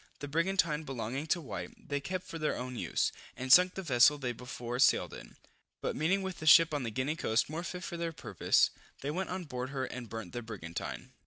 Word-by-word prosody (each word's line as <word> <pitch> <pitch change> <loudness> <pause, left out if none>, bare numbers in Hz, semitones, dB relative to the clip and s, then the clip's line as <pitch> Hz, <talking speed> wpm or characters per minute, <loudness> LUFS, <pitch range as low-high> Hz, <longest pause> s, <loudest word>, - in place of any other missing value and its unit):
The 145 - -6
brigantine 165 0 +1
belonging 135 +1 -4
to 175 - +2
White, 100 - -8
they 145 0 0
kept 180 +6 -4
for 165 - -7
their 155 - 0
own 125 0 -5
use, - - 0 0.3
and 130 +1 +4
sunk 180 0 +7
the 190 - -4
vessel 145 -1 +5
they 130 -4 -2
before 120 0 -5
sailed 130 - +4
in; - - -11 0.4
but - - -2
meeting 185 +6 +1
with 190 -3 -5
a 155 - -4
ship 165 0 +8
on 145 - 0
the 120 - -2
Guinea 130 +7 -1
coast 115 -3 +1
more 160 +2 -3
fit 180 +1 -6
for 170 - -5
their 170 0 -2
purpose, 110 - +2 0.3
they 140 - -2
went 185 +4 -2
on 185 0 -3
board 125 -4 -5
her 135 -1 -2
and 125 -3 -7
burnt 110 -6 -6
the 120 - -3
brigantine. 100 -8 -6
140 Hz, 225 wpm, -32 LUFS, 125-165 Hz, 0.4 s, ship